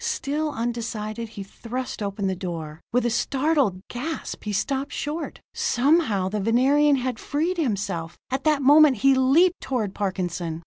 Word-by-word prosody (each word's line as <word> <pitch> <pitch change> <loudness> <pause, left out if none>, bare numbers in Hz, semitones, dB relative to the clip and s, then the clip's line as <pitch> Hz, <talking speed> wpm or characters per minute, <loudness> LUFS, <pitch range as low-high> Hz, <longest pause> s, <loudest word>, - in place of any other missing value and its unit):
Still 310 -10 -1
undecided, 230 -2 -4
he 200 -2 -7
thrust 245 +5 -6
open 200 0 -3
the 190 -1 0
door. 165 -3 -6
With 245 0 +1
a 240 - +1
startled 265 - +1
gasp 285 +3 -5
he 210 - -2
stopped 270 +7 -1
short. 305 +3 -4
Somehow 245 - +2
the 210 +2 -2
Venerian 270 +7 +4
had 255 -3 -2
freed 330 +5 -1
himself; 200 - -2
at 265 +1 -1
that 300 -3 +2
moment 290 -1 +7
he 275 - +7
leaped 295 +8 +4
toward 225 -7 -2
Parkinson. 175 -4 -3
245 Hz, 150 wpm, -24 LUFS, 200-285 Hz, -, moment